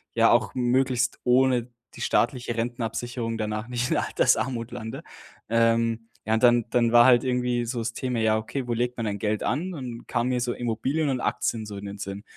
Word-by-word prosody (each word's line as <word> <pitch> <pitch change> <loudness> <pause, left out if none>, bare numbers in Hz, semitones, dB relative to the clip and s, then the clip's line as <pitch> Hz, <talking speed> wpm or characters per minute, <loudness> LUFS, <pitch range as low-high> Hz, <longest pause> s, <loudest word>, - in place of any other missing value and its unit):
ja, - - +5
auch - - +2
möglichst 125 0 +1
ohne 125 -1 +3 0.3
die - - -9
staatliche 120 0 0
Rentenabsicherung 115 0 -3
danach 110 +1 -3
nicht 125 0 -2
in - - +2
Altersarmut 115 0 +1
lande. 110 -2 -6 0.5
Ähm, 115 0 +1 0.2
ja, 110 - +2
und 110 - 0
dann 120 -2 +5
dann 120 -2 +2
war 120 0 +7
halt 120 -2 +6
irgendwie 125 -1 0
so 120 +1 -3
das 115 +1 -3
Thema: 125 -1 -2
„Ja, 110 -1 +3
okay, 125 +4 -4
wo 120 - 0
legt 120 +1 -1
man 115 - -2
dann 100 -1 -3
Geld 105 0 -1
an?“ 170 +9 -1
und 125 -5 -7
kamen 120 0 0
mir 125 -1 0
so 120 0 -1
Immobilien 130 +6 -1
und 130 -2 -1
Aktien 110 -2 -1
so 105 -1 -7
in 100 - -7
den 100 0 -7
Sinn. 100 0 -6
120 Hz, 205 wpm, -25 LUFS, 115-125 Hz, 0.5 s, war